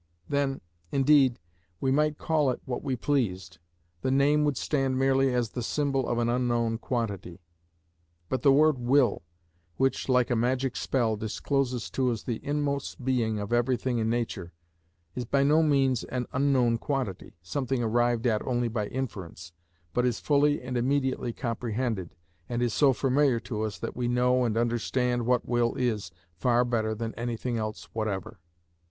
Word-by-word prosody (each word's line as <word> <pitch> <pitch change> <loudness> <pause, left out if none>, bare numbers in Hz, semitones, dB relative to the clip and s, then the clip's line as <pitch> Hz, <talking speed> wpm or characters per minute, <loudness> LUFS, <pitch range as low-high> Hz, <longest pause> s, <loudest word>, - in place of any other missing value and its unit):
Then, 140 -1 0 0.3
indeed, 135 -2 +4 0.4
we 130 - +1
might 150 +2 +2
call 155 -4 +1
it 125 - -2
what 125 -2 -3
we 135 -3 -1
pleased; 95 - -1 0.4
the - - 0
name 140 +3 +3
would 145 -4 0
stand 135 -3 0
merely 135 0 +3
as 120 -3 0
the 125 - -4
symbol 135 +1 0
of 120 - 0
an 120 0 +1
unknown 120 -2 0
quantity. 100 -9 -3 0.9
But 130 - -2
the 140 - +5
word 150 0 +4
will, 125 -2 +3 0.6
which, 135 0 0
like 125 -1 +3
a - - +3
magic 125 +2 0
spell, 115 -5 0
discloses 125 +3 -2
to 130 -1 +1
us 115 - -4
the 120 -3 -4
inmost 140 -3 -2
being 115 -4 +1
of 105 +2 -3
everything 120 0 +1
in 110 0 0
nature, 115 -7 -3 0.6
is 125 - -3
by 140 +3 +2
no 150 +3 +4
means 135 -5 +2
an 125 -1 -3
unknown 130 -4 +2
quantity, 130 -11 -3
something 130 +4 -2
arrived 120 +1 +1
at 110 -3 +2
only 120 -2 -1
by 110 -2 -2
inference, 95 -10 -6 0.4
but 125 - +1
is 125 -2 0
fully 145 -1 +2
and 125 0 -3
immediately 130 -1 0
comprehended, 115 -5 -3 0.3
and 120 0 -1
is 120 -3 0
so 140 -2 +5
familiar 135 -1 +2
to 110 -2 -4
us 105 -4 -3
that - - -5
we 125 -1 -1
know 125 +1 +2
and 115 -1 0
understand 120 +1 0
what 125 -1 +2
will 120 -1 +1
is 110 -7 -1 0.2
far 120 +8 +2
better 110 -2 0
than 115 +1 -4
anything 120 0 -3
else 110 -5 -4
whatever. 110 -1 -3
125 Hz, 165 wpm, -28 LUFS, 115-135 Hz, 0.9 s, the